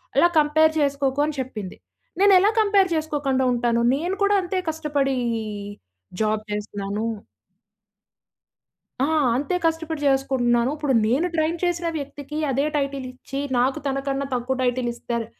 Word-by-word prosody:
అలా 345 - +5
కంపేర్ 315 +1 +4
చేసుకోకు" 280 0 +1
అని 300 -2 -4
చెప్పింది. 215 -7 -7 0.4
నేను 400 -1 +6
ఎలా 405 +3 +4
కంపేర్ 400 -3 +3
చేసుకోకుండా 285 -4 0
ఉంటాను. 235 -1 +1 0.2
నేను 350 +6 -2
కూడా 405 0 +4
అంతే 370 +1 -3
కష్టపడీ 290 -4 -1 1.1
జాబ్ 215 0 +1
చేస్తున్నాను. 205 0 -3 2.0
ఆ! - - +4 0.3
అంతే 295 +6 -1
కష్టపడి 325 -2 -1
చేసుకుంటున్నాను. 260 -2 +2
ఇప్పుడు 290 -3 -1
నేను 275 +11 +2
ట్రైన్ 320 +2 +1
చేసిన 345 -1 0
వ్యక్తికి, 285 +1 -7
అదే 275 +3 +1
టైటిల్ 275 -2 -2
ఇచ్చి. 270 +2 -7 0.2
నాకు 260 +2 +1
తనకన్నా 275 0 -2
తక్కువ 250 +2 -1
టైటిల్ 245 -1 0
ఇస్తారు, 235 -1 -4
275 Hz, 130 wpm, -23 LUFS, 250-315 Hz, 2.0 s, నేను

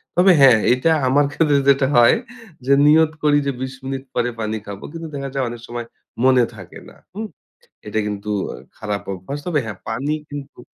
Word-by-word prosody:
তবে 185 +2 +6
হ্যাঁ 125 -5 +7
এটা 130 +6 +1 0.2
আমার 145 +3 +3
ক্ষেত্রে 150 -1 +2
যেটা 135 -1 +4
হয় 120 - +6 0.5
যে 140 - +4
নিয়ত 155 +1 +5
করি 145 -1 +4
যে - - +2
২০ 130 0 -4
মিনিট 135 0 -4
পরে 120 0 +1
পানি 110 0 -2
খাবো। 100 -1 -8
কিন্তু 165 0 -7
দেখা 140 0 -4
যায় 135 -2 -1
অনেক 120 -1 -8
সময় 120 -1 -6 0.4
মনে 130 -2 +5
থাকে 95 -4 -11
না, - - -18 0.2
হুম? 215 +3 -5 0.6
এটা 110 +1 -1
কিন্তু 105 0 -4 0.2
অ্যা - - -7 0.2
খারাপ 105 -2 -4
অভ্যাস। 95 +11 -6
তবে 165 -5 +1
হ্যাঁ 105 - -6
পানি 130 +7 -2 0.2
কিন্তু 145 -3 -9
130 Hz, 190 wpm, -20 LUFS, 110-145 Hz, 0.6 s, হ্যাঁ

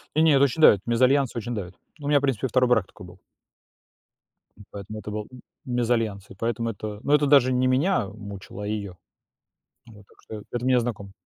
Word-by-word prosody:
Не 155 - +4
не, 160 - +5
это 135 0 +4
очень 140 +3 0
давит. 100 - +7
Мезальянс 130 +2 +2
очень 120 +1 -4
давит. 95 -4 -6 0.2
Ну, 145 - -6
у - - 0
меня, 145 - +4
в - - -10
принципе, 135 -2 -1
2 125 +1 +2
брак 115 -6 +2
такой 90 - -14
был. 90 +1 -15 1.4
М, 105 - -15
поэтому 105 +2 -8
это 105 - -8
был 105 0 -5 0.4
мезальянс. 115 -5 -1
И - - -12
поэтому 115 +2 -2
это 105 -1 -6
ну 145 - +1
это 150 0 +4
даже 135 -3 +5
не 130 +1 +2
меня 135 - +1
мучало, 100 0 -9
а - - -4
ее. 100 -4 -5 0.9
Вот 105 -3 -16
так - - -25
что, 110 -2 -9
это 120 0 -3
мне 130 -1 +4
знакомо. 105 -5 -5
115 Hz, 210 wpm, -24 LUFS, 105-130 Hz, 1.4 s, давит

